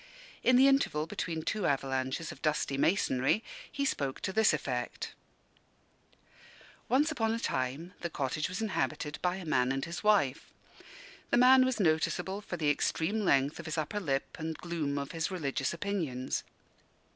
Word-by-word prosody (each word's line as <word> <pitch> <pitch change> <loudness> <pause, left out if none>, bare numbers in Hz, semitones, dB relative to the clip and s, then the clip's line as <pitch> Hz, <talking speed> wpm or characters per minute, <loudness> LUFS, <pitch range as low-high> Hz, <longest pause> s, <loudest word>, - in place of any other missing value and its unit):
In 255 - +4
the 265 +2 +7
interval 270 - +2
between 160 -1 -4
two 210 +2 -1
avalanches 135 +2 -1
of - - -12
dusty 150 -2 0
masonry, 140 - +2 0.3
he 280 -1 -1
spoke 140 - -1
to 190 - -2
this 220 0 +5
effect: 125 -5 -3 1.8
Once 285 +6 +3
upon 225 -6 0
a - - -3
time 135 - -2
the 170 - -2
cottage 150 +1 -2
was 185 +4 -3
inhabited 150 - -2
by 180 0 +1
a 190 -2 -7
man 125 -4 +2
and 135 0 -1
his 170 +3 -6
wife. 195 -11 +2 0.8
The - - +3
man 255 +1 +7
was 255 -3 -1
noticeable 190 +3 +1
for 175 - -5
the 150 -3 +2
extreme 165 +8 0
length 140 -8 +2
of - - -7
his 160 - -3
upper 155 +7 -1
lip 140 -8 -2
and 160 0 -4
gloom 160 -5 -2
of 140 -1 -3
his 165 -1 -2
religious 145 -7 -1
opinions. 165 -9 -2
160 Hz, 160 wpm, -31 LUFS, 140-205 Hz, 1.8 s, the